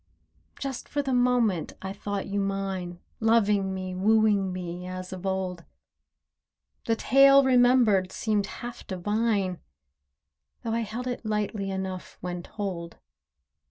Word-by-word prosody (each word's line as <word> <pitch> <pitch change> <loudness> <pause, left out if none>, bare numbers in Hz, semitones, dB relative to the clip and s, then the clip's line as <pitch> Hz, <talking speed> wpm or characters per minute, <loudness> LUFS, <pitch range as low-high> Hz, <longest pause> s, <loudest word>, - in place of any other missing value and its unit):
Just 270 -3 -5
for 290 0 -1
the 265 -1 -1
moment 245 -8 +2
I 190 0 -5
thought 200 -1 -4
you 200 +1 -2
mine— 195 -3 -3 0.2
Loving 210 -4 +3
me, 185 -1 -4
wooing 205 0 +3
me, 180 0 -5
as 185 +1 -6
of 185 +1 -5
old. 185 -2 -2 1.2
The 225 - +2
tale 275 +3 +6
remembered 245 -7 +4
seemed 210 -3 0
half 240 +2 -8
divine— 200 -1 0 1.0
Though 225 - -2
I 230 - +1
held 230 +2 -4
it 245 -1 -4
lightly 210 -2 -2
enough 190 -1 -5
when 175 0 -4
told. 175 -4 -5
200 Hz, 125 wpm, -27 LUFS, 185-230 Hz, 1.2 s, tale